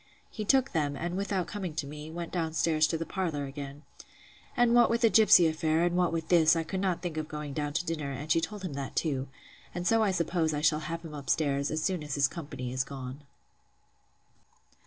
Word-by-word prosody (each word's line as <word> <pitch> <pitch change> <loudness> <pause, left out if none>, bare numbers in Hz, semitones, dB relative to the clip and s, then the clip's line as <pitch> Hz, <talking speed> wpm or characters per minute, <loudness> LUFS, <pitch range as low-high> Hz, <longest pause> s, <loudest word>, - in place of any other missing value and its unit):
He 215 - -5
took 265 +3 +3
them; 145 -3 0
and, 175 +5 -3
without 195 -2 -1
coming 185 -7 -5
to 145 - -2
me, 150 +2 -8
went 170 +1 -6
down 165 -3 -2
to 160 0 +2
the 165 - -4
parlour 165 -8 -2
again. 140 +1 -8 0.7
And 240 -1 +4
what 240 -1 +6
with 230 0 +1
the 230 -2 +5
gipsy 210 -5 +7
affair, 160 +1 +1
and 175 0 +1
what 180 -2 +2
with 165 -1 -3
this, 165 -2 +5
I 165 - 0
could 185 +4 -4
not 185 -2 -1
think 170 -3 -4
of 155 -1 -2
going 150 -2 -6
down 145 0 -2
to 170 +3 -1
dinner; 155 -4 -3
and 145 +4 -5
she 165 - +4
told 205 +2 -5
him 180 -6 -4
that 140 -1 -5
too; 135 -4 -1 0.5
and 175 0 -3
so 225 +4 +4
I 215 - +3
suppose 170 -3 0
I 145 - -2
shall 150 0 +3
have 165 0 -4
him 155 - -8
up 140 -3 -7
stairs, 140 -2 +1
as 155 0 -2
soon 185 -2 0
as 150 -2 -4
his 140 -1 +3
company 140 -5 -6
is 130 0 0
gone. 135 0 -8
160 Hz, 225 wpm, -29 LUFS, 145-180 Hz, 0.7 s, gipsy